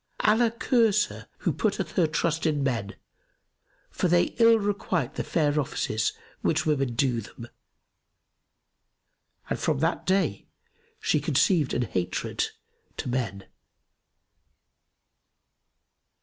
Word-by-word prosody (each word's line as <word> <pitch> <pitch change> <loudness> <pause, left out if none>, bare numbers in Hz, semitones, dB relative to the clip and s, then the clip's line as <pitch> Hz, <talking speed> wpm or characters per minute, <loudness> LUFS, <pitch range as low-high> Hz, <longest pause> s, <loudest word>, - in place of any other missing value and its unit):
Allah 225 +2 +4
curse 225 -2 +2
her - - -11
who - - -1
putteth - - -1
her 175 -4 +2
trust 165 +1 0
in 150 -3 0
men, 115 -7 -2 1.0
for - - 0
they 175 0 +2
ill 230 0 +7
requite 200 - -1
the - - -3
fair 150 -2 +1
offices 110 -5 -1 0.3
which 155 -1 +1
women 135 -6 0
do 120 -2 +1
them!' 115 +2 -10 2.0
And - - -2
from 155 - +1
that 165 +2 0
day 185 - +1 0.5
she 150 - +1
conceived 150 +1 +2
an 125 - +1
hatred 90 -5 -2 0.5
to - - -4
men." 110 -6 -2
155 Hz, 110 wpm, -26 LUFS, 125-185 Hz, 2.0 s, ill